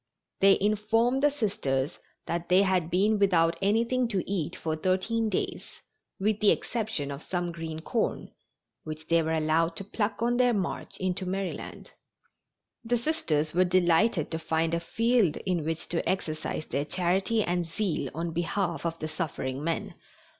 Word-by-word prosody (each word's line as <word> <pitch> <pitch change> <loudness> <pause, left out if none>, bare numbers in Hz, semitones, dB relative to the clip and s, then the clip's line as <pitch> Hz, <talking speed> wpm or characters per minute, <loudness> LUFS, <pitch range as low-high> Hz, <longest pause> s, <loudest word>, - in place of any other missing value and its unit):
They 195 0 +6
informed 225 +5 +2
the 295 - +5
Sisters 180 - -1 0.3
that 170 0 -3
they 185 +2 +6
had 185 -4 +1
been 205 +4 +2
without 170 -4 +3
anything 235 +5 +2
to 195 -5 -2
eat 185 -6 -2
for 160 -1 -2
thirteen 190 +7 0
days, 195 - -3 0.4
with 210 +1 +1
the 210 - +5
exception 215 -12 -1
of 140 +1 -6
some 175 -1 -2
green 160 -1 -6
corn, 225 +7 -2 0.5
which 155 0 -7
they 170 0 +4
were 160 0 -1
allowed 160 +1 +1
to 195 - -4
pluck 205 +2 -2
on 240 +1 +2
their 245 -2 +4
march 190 -4 -3
into 185 0 -2
Maryland. 190 0 -4 0.9
The 240 +1 +1
Sisters 160 - 0
were 180 +2 +4
delighted 180 0 +2
to 160 - -2
find 160 0 0
a 170 - +2
field 225 0 +2
in 180 -4 0
which 160 +2 -3
to 170 - -1
exercise 155 -4 -2
their 140 - -1
charity 190 +6 +1
and 175 -2 -1
zeal 165 -5 -1
on 165 +1 -2
behalf 175 +1 -1
of 165 0 -4
the 155 - -4
suffering 145 -3 -3
men. 165 +1 -2
180 Hz, 160 wpm, -28 LUFS, 165-210 Hz, 0.9 s, They